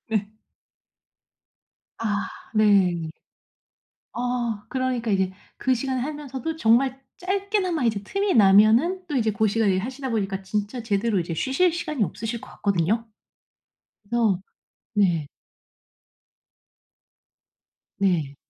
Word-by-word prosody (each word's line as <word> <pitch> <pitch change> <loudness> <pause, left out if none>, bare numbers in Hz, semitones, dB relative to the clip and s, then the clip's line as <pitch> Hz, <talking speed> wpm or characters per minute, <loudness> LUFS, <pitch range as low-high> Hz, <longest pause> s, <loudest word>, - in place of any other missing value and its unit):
네. 215 -1 -2 1.6
아 215 -1 -1 0.3
네. 190 -6 +3 1.0
어 240 -3 -2
그러니까 255 -3 -1
이제 190 -1 +1 0.3
그 260 - +1
시간에 260 +1 -1
하면서도 295 +1 -4
정말 265 +1 +3 0.2
짧게나마 380 - 0
이제 215 -3 +1
틈이 395 - 0
나면은 225 - +5
또 295 - -3
이제 225 -4 +2
고시간 215 +1 +2
일하시다 255 +8 -2
보니까 195 -4 -1
진짜 210 +5 -3
제대로 210 -1 +1
이제 170 -1 -3
쉬실 270 - +2
시간이 310 -7 -1
없으실 225 +6 -4
것 - - -12
같거든요? 200 +4 0 1.0
그래서 220 -3 +1 0.6
네. 175 -7 +2 2.7
네. 170 -8 +1
225 Hz, 225 characters per minute, -24 LUFS, 200-265 Hz, 2.7 s, 나면은